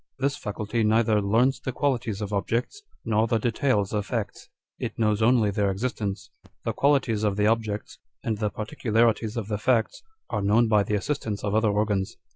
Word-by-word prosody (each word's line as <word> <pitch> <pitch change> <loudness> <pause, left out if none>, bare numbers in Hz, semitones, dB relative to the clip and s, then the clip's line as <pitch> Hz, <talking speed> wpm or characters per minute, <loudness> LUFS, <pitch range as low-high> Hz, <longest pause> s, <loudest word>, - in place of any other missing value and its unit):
This 140 +1 0
faculty 105 +2 -2
neither 110 0 +3
learns 115 +7 +2
the 130 - -4
qualities 120 -6 -1
of 105 0 -4
objects, 115 - -1 0.2
nor 110 +1 +2
the 115 -1 +2
details 110 -2 0
of 105 -1 -1
facts: 115 -5 -4 0.3
it - - -4
knows 105 -1 +1
only 110 -2 +4
their 100 0 +1
existence. 95 -3 -3 0.3
The - - 0
qualities 135 -7 +2
of 105 -2 +1
the 105 - +2
objects, 110 -1 -1 0.2
and 110 -2 -2
the 105 -1 0
particularities 110 0 0
of 110 -4 -3
the 105 -2 -2
facts, 115 -1 +1 0.3
are - - -1
known 110 +4 +3
by 105 -2 +4
the 105 +1 -1
assistance 105 -2 -3
of 105 -1 -1
other 110 0 +3
organs. 100 -2 0
110 Hz, 180 wpm, -26 LUFS, 105-115 Hz, 0.3 s, only